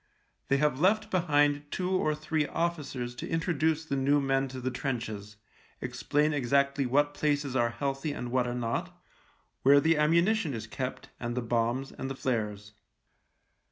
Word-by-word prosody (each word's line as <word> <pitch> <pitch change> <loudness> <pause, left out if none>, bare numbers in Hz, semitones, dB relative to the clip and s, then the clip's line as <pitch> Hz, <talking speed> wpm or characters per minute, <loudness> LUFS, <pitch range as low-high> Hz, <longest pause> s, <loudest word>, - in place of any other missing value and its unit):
They 140 - +3
have 145 -2 +1
left 215 +5 +2
behind 145 -4 +2
two 185 +3 -2
or 155 -5 +1
three 155 0 -1
officers 145 -8 -2
to - - -5
intro 165 +2 0
duce 160 +1 +1
the 140 - -2
new 140 +2 +3
men 135 -1 +1
to 130 0 -7
the 130 +1 -2
trenches, 110 -6 -4 0.4
explain 135 +5 0
exactly 140 0 +2
what 145 +3 +2
places 145 -3 0
are 120 -2 +3
healthy 135 +4 -2
and 125 -4 -5
what 125 -1 +2
are 120 - -2
not 115 -1 -3 0.3
— - - -40
where 140 +2 +7
the 160 +1 +3
ammunition 170 - +3
is 110 -1 -5
kept, 125 +3 -5
and 120 0 -3
the 125 - 0
bombs, 120 +3 0
and 135 - -5
the 135 - -4
flares. 105 -6 -2
140 Hz, 170 wpm, -29 LUFS, 125-150 Hz, 0.4 s, where